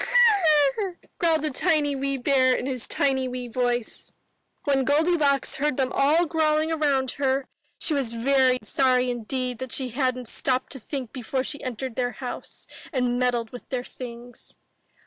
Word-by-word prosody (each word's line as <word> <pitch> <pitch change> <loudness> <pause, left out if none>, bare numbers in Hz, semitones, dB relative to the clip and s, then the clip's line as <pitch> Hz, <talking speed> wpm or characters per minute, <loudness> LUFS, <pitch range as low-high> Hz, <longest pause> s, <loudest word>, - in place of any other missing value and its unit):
''Gr - - -3
r 400 - +4
r!" 360 - -9 0.2
growled 330 -4 +2
the 305 - 0
tiny 290 +1 +1
wee 275 0 0
bear 260 0 +3
in - - -3
his 255 -3 -2
tiny 265 -2 +1
wee 250 -1 -4
voice. 245 -1 -2 0.5
When 275 -2 +2
Goldilocks 290 -1 +2
heard 290 -1 0
them 260 -2 0
all 300 +5 +3
growling 315 -1 +1
around 280 -5 +1
her, 270 0 +1 0.3
she 315 - +1
was 260 -5 0
very 260 +1 +3
sorry 255 +2 +2
indeed 250 +1 -3
that 260 -2 -6
she 260 0 -1
hadn't 255 -1 -1
stopped 255 +2 -1
to 265 - -3
think 255 0 -6
before 255 +1 -2
she 290 +1 -4
entered 255 -1 -4
their 245 -1 -1
house 255 -2 -6 0.3
and 250 -4 0
meddled 240 -3 0
with 245 - -11
their 250 -2 -2
things. 245 -1 -10
265 Hz, 165 wpm, -25 LUFS, 250-290 Hz, 0.5 s, r